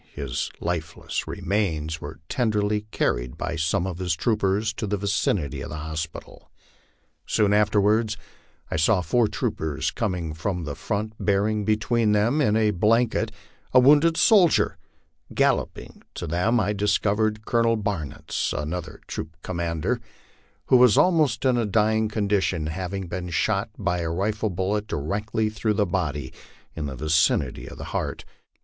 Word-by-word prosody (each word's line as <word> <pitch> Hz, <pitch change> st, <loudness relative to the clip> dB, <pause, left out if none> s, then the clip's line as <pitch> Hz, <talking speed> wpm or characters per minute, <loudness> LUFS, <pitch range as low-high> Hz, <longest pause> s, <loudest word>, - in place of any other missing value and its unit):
His -, -, -3 dB
lifeless 85 Hz, -2 st, -3 dB
remains 80 Hz, -6 st, -2 dB
were 75 Hz, +2 st, -8 dB
tenderly 105 Hz, -3 st, 0 dB
carried -, -, -1 dB
by -, -, -3 dB
some 80 Hz, +3 st, 0 dB
of 90 Hz, -2 st, -5 dB
his 90 Hz, -3 st, 0 dB
troopers 105 Hz, +1 st, 0 dB
to 110 Hz, 0 st, -4 dB
the 105 Hz, +1 st, 0 dB
vicinity 95 Hz, -8 st, -1 dB
of 85 Hz, -, -6 dB
the 75 Hz, -, -6 dB
hospital. 80 Hz, +1 st, -6 dB, 0.8 s
Soon 105 Hz, -1 st, +2 dB
after 105 Hz, 0 st, +3 dB
wards 105 Hz, +1 st, +2 dB, 0.5 s
I -, -, 0 dB
saw 90 Hz, +5 st, +3 dB
four 110 Hz, +7 st, +2 dB
troopers 80 Hz, -4 st, -2 dB
coming 90 Hz, -8 st, -2 dB
from 90 Hz, +3 st, -3 dB
the 75 Hz, -2 st, -4 dB
front 110 Hz, +6 st, -3 dB
bearing 105 Hz, +1 st, +1 dB
between 110 Hz, +1 st, +2 dB
them, 115 Hz, +9 st, +2 dB
in 105 Hz, -7 st, +3 dB
a 110 Hz, -1 st, +3 dB
blanket, 110 Hz, +3 st, +2 dB, 0.4 s
a -, -, +10 dB
wounded 150 Hz, +5 st, +5 dB
soldier; 195 Hz, -7 st, +4 dB, 0.6 s
galloping -, -, 0 dB
to -, -, -4 dB
them, 100 Hz, +9 st, +1 dB
I 105 Hz, 0 st, +1 dB
discovered 105 Hz, +1 st, +1 dB
Colonel 115 Hz, -1 st, +2 dB
Baruitz, 95 Hz, -9 st, -3 dB
another 80 Hz, +2 st, -4 dB
troop 80 Hz, +1 st, -6 dB
commander, 85 Hz, +6 st, -2 dB, 0.6 s
who 130 Hz, -, +5 dB
was 125 Hz, -4 st, +6 dB
almost 155 Hz, -10 st, +3 dB
in 130 Hz, -2 st, +3 dB
a 115 Hz, -, +1 dB
dying 110 Hz, +1 st, +2 dB
condition, 100 Hz, -6 st, 0 dB
having 95 Hz, +4 st, -4 dB
been 90 Hz, +1 st, -5 dB
shot 100 Hz, +5 st, 0 dB
by 95 Hz, -4 st, -1 dB
a 85 Hz, -1 st, -2 dB
rifle 105 Hz, +5 st, -1 dB
bullet 100 Hz, +3 st, -1 dB
directly 105 Hz, +8 st, -2 dB
through 105 Hz, 0 st, -1 dB
the 105 Hz, -1 st, +2 dB
body 75 Hz, -7 st, -2 dB, 0.4 s
in 75 Hz, -2 st, -3 dB
the 70 Hz, -, -5 dB
vicinity 80 Hz, +5 st, +1 dB
of -, -, -11 dB
the -, -, -7 dB
heart. -, -, -3 dB
100 Hz, 150 wpm, -25 LUFS, 85-110 Hz, 0.8 s, a